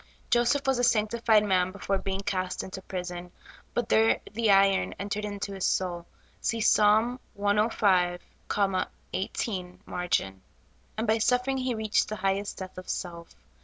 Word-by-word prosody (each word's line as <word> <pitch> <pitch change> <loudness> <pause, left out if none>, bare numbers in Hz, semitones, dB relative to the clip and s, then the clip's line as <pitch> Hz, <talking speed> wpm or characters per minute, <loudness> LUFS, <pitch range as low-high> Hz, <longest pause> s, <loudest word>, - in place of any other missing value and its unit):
Joseph 240 +4 +3
was 265 -2 +2
a - - +1
sanctified 225 -1 +3
man 185 -2 +2
before 195 0 -2
being 195 0 -3
cast 185 -2 -2
into 190 0 -7
prison; 180 -1 -6 0.4
but 240 -2 0
there 225 -1 +4
the 225 0 +1
iron 195 -1 +4
entered 205 +1 -3
into 200 -1 -4
his 190 -1 -5
soul 175 -2 -1 0.3
(see 230 - 0
Ps. 220 - +4
105, 210 -4 +2 0.9
18 185 -1 -3
margin), 95 - -1 0.6
and 220 - -1
by 220 0 +2
suffering 250 +4 +1
he 255 -2 -1
reached 215 -1 +1
the 215 - -3
highest 195 +1 -1
death 185 -1 -7
of 185 - -11
self. 170 -2 -4
200 Hz, 145 wpm, -28 LUFS, 185-225 Hz, 0.9 s, there